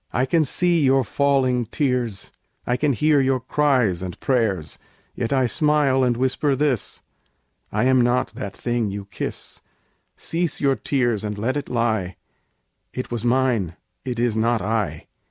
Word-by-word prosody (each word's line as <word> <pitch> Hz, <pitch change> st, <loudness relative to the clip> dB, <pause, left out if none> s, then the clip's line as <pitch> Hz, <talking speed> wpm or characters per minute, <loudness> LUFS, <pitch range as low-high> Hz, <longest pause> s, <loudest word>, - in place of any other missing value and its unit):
I 125 Hz, -, +1 dB
can 160 Hz, +3 st, +2 dB
see 175 Hz, +4 st, +1 dB
your 135 Hz, 0 st, +4 dB
falling 130 Hz, -2 st, +1 dB
tears, 125 Hz, -8 st, -2 dB, 0.3 s
I 125 Hz, -, +1 dB
can 140 Hz, +2 st, +1 dB
hear 150 Hz, +4 st, +3 dB
your 130 Hz, -1 st, +1 dB
cries 130 Hz, -9 st, +1 dB
and 90 Hz, -2 st, -6 dB
prayers, 110 Hz, -, 0 dB, 0.3 s
Yet 115 Hz, -, -3 dB
I 135 Hz, -2 st, +3 dB
smile 140 Hz, 0 st, +2 dB
and 120 Hz, -2 st, +1 dB
whisper 130 Hz, +2 st, +1 dB
this: 135 Hz, -5 st, -1 dB, 0.7 s
"I -, -, 0 dB
am 130 Hz, 0 st, +4 dB
not 120 Hz, +1 st, +1 dB
that 100 Hz, -, -7 dB
thing 120 Hz, -3 st, -1 dB
you 100 Hz, 0 st, -6 dB
kiss; 100 Hz, -, -6 dB, 0.5 s
Cease 165 Hz, -1 st, -2 dB
your 135 Hz, -2 st, +2 dB
tears 120 Hz, -3 st, 0 dB
and 105 Hz, -1 st, -4 dB
let 120 Hz, +6 st, -1 dB
it 145 Hz, -1 st, -4 dB
lie: 110 Hz, -6 st, 0 dB, 0.8 s
It 130 Hz, -, -5 dB
was 120 Hz, -2 st, -2 dB
mine, 120 Hz, -8 st, +1 dB, 0.3 s
it 125 Hz, -3 st, -4 dB
is 120 Hz, -2 st, +1 dB
not 115 Hz, +1 st, +2 dB
I." 110 Hz, 0 st, -2 dB
125 Hz, 155 wpm, -22 LUFS, 110-135 Hz, 0.8 s, your